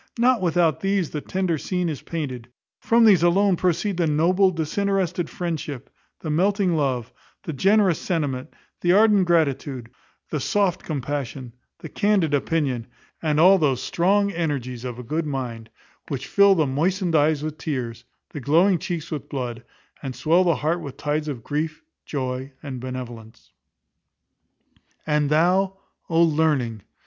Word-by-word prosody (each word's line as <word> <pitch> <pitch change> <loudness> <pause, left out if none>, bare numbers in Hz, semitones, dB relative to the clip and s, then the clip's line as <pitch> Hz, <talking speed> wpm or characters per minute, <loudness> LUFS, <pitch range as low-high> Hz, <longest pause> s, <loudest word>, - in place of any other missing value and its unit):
Not 245 -1 +3
without 170 -4 +2
these 195 -4 0
the 150 - -4
tender 185 -3 -1
scene 180 +1 -2
is 155 -4 -4
painted. 130 -8 -5 0.3
From 230 0 +4
these 195 -7 +6
alone 185 +3 +3
proceed 180 +2 0
the 170 -2 +1
noble, 180 +6 +3
disinterested 180 +1 -1
friendship, 155 -6 -5 0.3
the 155 - -3
melting 190 +2 +2
love, 130 -6 -1 0.3
the 160 - -5
generous 195 +3 +3
sentiment, 145 -5 -2 0.3
the 175 0 +3
ardent 205 -2 +5
gratitude, 140 -7 0 0.4
the 150 - -1
soft 195 +5 +1
compassion, 135 -4 -4 0.3
the 160 - -7
candid 195 -4 +1
opinion; 140 -5 0 0.3
and 150 -2 +1
all 190 +3 +7
those 135 -6 +1
strong 200 +7 +1
energies 140 -8 -3
of 125 -2 -5
a 125 - -7
good 155 +6 -2
mind, 120 -5 -5 0.4
which 135 -2 -4
fill 200 -1 +5
the 160 -4 +2
moistened 170 +6 0
eyes 150 0 +3
with 155 0 -5
tears, 120 -6 -4 0.3
the 145 - -6
glowing 170 +7 +3
cheeks 170 -2 -5
with 150 - -5
blood, 125 -4 -4 0.4
and 135 -3 -5
swell 170 +4 +3
the 170 -3 +2
heart 165 +4 -1
with 140 -5 -8
tides 150 +1 -2
of 130 -6 -5
grief, 155 +3 -3 0.2
joy, 130 -1 -3
and 135 -3 -6
benevolence. 120 -3 -8 1.5
And 150 -2 +1
thou, 185 +5 +2 0.3
O 165 0 +4
Learning! 150 -9 +1
155 Hz, 150 wpm, -23 LUFS, 135-180 Hz, 1.5 s, all